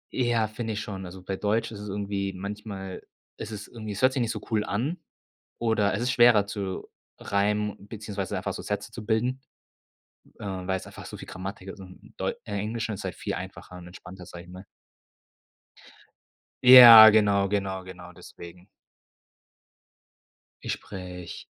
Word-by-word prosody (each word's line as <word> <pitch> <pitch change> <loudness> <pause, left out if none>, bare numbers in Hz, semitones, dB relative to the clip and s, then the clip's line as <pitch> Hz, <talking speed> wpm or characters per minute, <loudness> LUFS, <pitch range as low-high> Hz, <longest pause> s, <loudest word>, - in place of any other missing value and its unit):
Ja, 120 -3 +1
finde 110 +1 -5
ich 105 - -3
schon. 95 -3 -7
Also 90 +1 -11
bei 95 +1 -4
Deutsch 110 +3 -1
ist 105 - -8
es 105 0 -7
irgendwie 100 -1 -3
manchmal 100 0 -7 0.3
es - - -7
ist 105 -1 -7
irgendwie 110 -3 -7
es 100 - -6
hört 130 0 +5
sich 130 - -1
nicht 115 - -1
so - - -6
cool 110 -2 +1
an 135 - -2 0.6
oder 110 -3 +1
es 110 - -2
ist 125 - 0
schwerer 120 -4 +5
zu 100 -2 -5 0.3
reimen 105 0 -1
beziehungsweise 105 -3 -5
einfach - - -3
so - - -7
Sätze - - -4
zu - - -9
bilden, 120 +4 0 1.0
äh, - - -9
weil's 95 -1 -3
einfach - - -11
so - - -9
viel - - -11
Grammatik 95 +1 -7
ist 95 - -10
und 90 -1 -14
deu - - -3 0.2
äh, 105 - -7
Englisch 110 +2 -3
ist 105 -3 -5
halt - - -5
viel - - -5
einfacher 90 - -8
und 90 -1 -11
entspannter, 90 0 -12
sage 85 0 -10
ich 90 - -17
mal. 95 +2 -11 2.0
Ja, 120 -3 +12
genau, 100 -2 +3
genau, 95 -2 -2
genau 90 -1 -11
deswegen. 85 +1 -13 2.0
Ich - - -2
spreche 90 -3 -8
100 Hz, 165 wpm, -26 LUFS, 95-110 Hz, 2.0 s, Ja